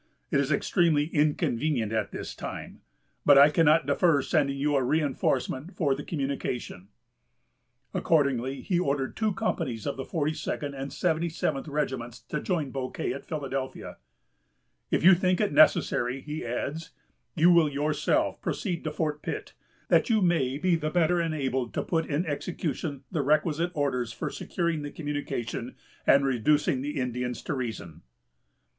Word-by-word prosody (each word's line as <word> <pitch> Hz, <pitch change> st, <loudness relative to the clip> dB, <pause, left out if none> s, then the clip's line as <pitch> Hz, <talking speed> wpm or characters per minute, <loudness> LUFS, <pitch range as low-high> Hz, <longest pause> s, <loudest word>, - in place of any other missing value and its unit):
It -, -, +3 dB
is 140 Hz, +1 st, 0 dB
extremely 155 Hz, 0 st, +2 dB
inconvenient 145 Hz, -5 st, +1 dB
at 110 Hz, -2 st, 0 dB
this -, -, -6 dB
time;... -, -, -7 dB, 0.4 s
but 145 Hz, -1 st, +7 dB
I 140 Hz, +2 st, +8 dB
cannot 160 Hz, +1 st, +4 dB
defer 160 Hz, -7 st, +3 dB
sending 140 Hz, -1 st, +1 dB
you 145 Hz, +1 st, +1 dB
a 135 Hz, -, +3 dB
reinforcement 140 Hz, +2 st, 0 dB
for 145 Hz, -6 st, +2 dB
the 140 Hz, +2 st, -5 dB
communication." 135 Hz, -, -4 dB, 1.1 s
Accordingly 140 Hz, -4 st, +1 dB
he 180 Hz, -3 st, 0 dB
ordered 140 Hz, -5 st, -1 dB
two 220 Hz, -1 st, +1 dB
companies 130 Hz, -, -2 dB
of 140 Hz, -, -2 dB
the 135 Hz, -, -3 dB
42d 150 Hz, -2 st, -2 dB
and 135 Hz, +1 st, -5 dB
77th 165 Hz, -4 st, -1 dB
regiments 130 Hz, -5 st, -3 dB
to 150 Hz, -, -5 dB
join 160 Hz, -8 st, -1 dB
Bouquet 130 Hz, -1 st, -3 dB
at 140 Hz, -, -9 dB
Philadelphia. 135 Hz, -3 st, -4 dB, 0.9 s
"If -, -, +1 dB
you 190 Hz, +2 st, +9 dB
think 185 Hz, 0 st, +2 dB
it 210 Hz, -7 st, +1 dB
necessary," 135 Hz, -3 st, +4 dB
he 150 Hz, +2 st, -5 dB
adds, 140 Hz, +7 st, -4 dB, 0.5 s
"you 170 Hz, +3 st, +5 dB
will 170 Hz, -3 st, +5 dB
yourself 150 Hz, +1 st, 0 dB
proceed 180 Hz, -7 st, -3 dB
to 155 Hz, -, -1 dB
Fort 150 Hz, -1 st, -2 dB
Pitt, -, -, -5 dB, 0.4 s
that -, -, +4 dB
you 220 Hz, -2 st, +4 dB
may 145 Hz, -7 st, +2 dB
be 175 Hz, +2 st, +2 dB
the 155 Hz, -2 st, -1 dB
better 175 Hz, +1 st, +2 dB
enabled 135 Hz, -7 st, -2 dB
to -, -, 0 dB
put 165 Hz, -2 st, -1 dB
in 155 Hz, +4 st, 0 dB
execution 150 Hz, -2 st, -3 dB
the 155 Hz, -, 0 dB
requisite 155 Hz, +4 st, +1 dB
orders 125 Hz, -5 st, -1 dB
for -, -, -4 dB
securing 170 Hz, -3 st, -2 dB
the 145 Hz, -, -5 dB
communication 145 Hz, -6 st, -4 dB, 0.3 s
and 140 Hz, 0 st, +6 dB
reducing 135 Hz, +1 st, +2 dB
the 145 Hz, +1 st, -3 dB
Indians 125 Hz, -1 st, -3 dB
to -, -, -2 dB
reason." 110 Hz, -, -5 dB
145 Hz, 150 wpm, -27 LUFS, 135-160 Hz, 1.1 s, you